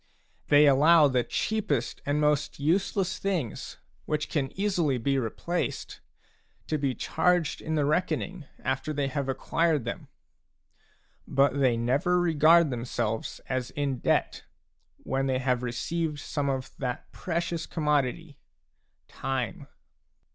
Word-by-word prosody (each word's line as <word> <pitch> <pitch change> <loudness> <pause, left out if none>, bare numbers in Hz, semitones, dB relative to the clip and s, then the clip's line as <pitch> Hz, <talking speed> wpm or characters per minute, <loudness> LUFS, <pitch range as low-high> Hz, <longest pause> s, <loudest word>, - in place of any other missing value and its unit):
They 145 +1 +6
allow 150 +3 +6
the 125 -3 +1
cheapest 195 - -1
and 145 +1 +1
most 150 -1 +1
useless 185 +4 0
things, 175 - -3 0.3
which 150 -1 -1
can 135 -4 -1
easily 175 -10 +1
be 135 +3 +1
replaced, 170 +9 -3 0.7
to 155 - -1
be 135 -3 0
charged 170 +5 +1
in 160 0 -2
the 150 -2 +2
reckoning, 175 +2 -1 0.2
after 135 +4 -1
they 140 -2 -1
have 140 -1 -2
acquired 155 +1 0
them; 115 - -5 1.2
but 140 0 +2
they 125 -4 +3
never 140 +10 +2
regard 165 -1 +5
themselves 115 -2 -3
as 125 -2 -2
in 140 -3 -2
debt - - 0 0.6
when 135 0 -1
they 130 -1 +1
have 125 -1 0
received 150 +6 -2
some 145 0 -2
of 130 -1 -3
that 125 -2 -4
precious 170 -1 -3
commodity, 150 0 -1 0.4
— - - -47
time 130 -7 -4
145 Hz, 125 wpm, -28 LUFS, 130-165 Hz, 1.2 s, They